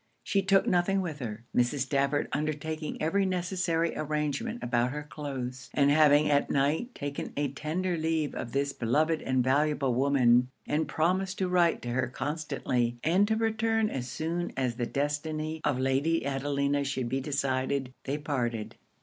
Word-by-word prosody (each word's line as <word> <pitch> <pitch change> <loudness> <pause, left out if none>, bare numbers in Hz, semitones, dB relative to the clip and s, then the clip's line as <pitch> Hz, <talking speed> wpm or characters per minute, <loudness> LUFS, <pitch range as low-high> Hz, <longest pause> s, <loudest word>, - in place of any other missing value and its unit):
She 200 - +1
took 195 0 +3
nothing 185 +2 +2
with 160 -5 -4
her, 115 -3 -5
Mrs. 125 +3 +2
Stafford 140 +1 +1
undertaking 155 +1 -3
every 195 +6 +1
necessary 180 -3 0
arrangement 150 - -2
about 120 0 +1
her 150 +3 -5
cloaths 135 -3 -6
and 140 -1 +4
having 150 0 +5
at 145 -1 +2
night 150 - 0
taken 145 0 -4
a 145 -2 0
tender 170 +6 -2
leave 160 -2 0
of 120 - -5
this 140 +1 0
beloved 155 +7 +1
and 130 -1 +1
valuable 140 0 +2
woman, 125 -2 +4 0.2
and 155 +2 0
promised 185 +4 0
to 190 - 0
write 175 -2 +2
to 120 - -4
her 130 +1 0
constantly 130 -4 -2
and 185 +6 +3
to 220 - +2
return 225 0 +1
as 125 -2 -3
soon 165 +7 -3
as 130 -3 0
the 120 - -1
destiny 155 +2 -2
of 145 -4 +1
Lady 135 +5 +1
Adelina 140 +1 0
should 135 -3 -2
be 135 +3 -1
decided, 135 -1 -1
they 140 +2 -1
parted. 120 -7 -3
145 Hz, 160 wpm, -29 LUFS, 135-165 Hz, 0.2 s, having